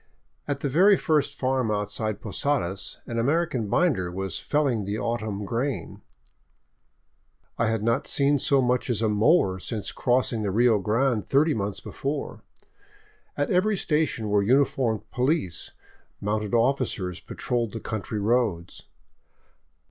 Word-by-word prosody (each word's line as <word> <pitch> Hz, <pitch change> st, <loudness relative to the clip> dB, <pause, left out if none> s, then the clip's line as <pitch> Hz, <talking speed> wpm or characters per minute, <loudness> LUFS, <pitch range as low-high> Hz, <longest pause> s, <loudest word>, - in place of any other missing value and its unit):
At 140 Hz, -1 st, -2 dB
the -, -, 0 dB
very 185 Hz, +8 st, +5 dB
first 150 Hz, -3 st, 0 dB
farm 130 Hz, -3 st, 0 dB
outside 105 Hz, 0 st, -2 dB
Posadas 105 Hz, -4 st, -2 dB
an 115 Hz, 0 st, -3 dB
American 140 Hz, -2 st, 0 dB
binder 100 Hz, -, +1 dB
was 95 Hz, -2 st, -3 dB
felling 140 Hz, -8 st, 0 dB
the 100 Hz, +2 st, -3 dB
autumn 110 Hz, -3 st, -3 dB
grain 125 Hz, +6 st, -3 dB, 0.7 s
— -, -, -41 dB
and 115 Hz, -, +2 dB
I -, -, +1 dB
had 110 Hz, -2 st, -1 dB
not 115 Hz, +1 st, +1 dB
seen 140 Hz, 0 st, +2 dB
so 135 Hz, 0 st, +3 dB
much 125 Hz, +1 st, 0 dB
as 115 Hz, -2 st, 0 dB
a 110 Hz, -, +2 dB
mower 105 Hz, -, +3 dB
since 105 Hz, +2 st, -3 dB
crossing 125 Hz, -2 st, +1 dB
the 105 Hz, -, -1 dB
Rio 115 Hz, +2 st, +3 dB
Grande 115 Hz, +3 st, 0 dB
thirty 150 Hz, +3 st, +3 dB
months 100 Hz, -1 st, -3 dB
before. 140 Hz, +1 st, -4 dB, 1.0 s
At 145 Hz, -, 0 dB
every 200 Hz, +3 st, +2 dB
station 150 Hz, -10 st, 0 dB
were 105 Hz, 0 st, +3 dB
uniformed 120 Hz, -1 st, +2 dB
police; 125 Hz, -, -1 dB, 0.5 s
mounted 105 Hz, +2 st, -1 dB
officers 115 Hz, -7 st, 0 dB
patroled 120 Hz, -3 st, -3 dB
the 115 Hz, -, -4 dB
country 110 Hz, 0 st, -4 dB
roads. 105 Hz, -5 st, -1 dB
115 Hz, 140 wpm, -25 LUFS, 105-140 Hz, 1.0 s, very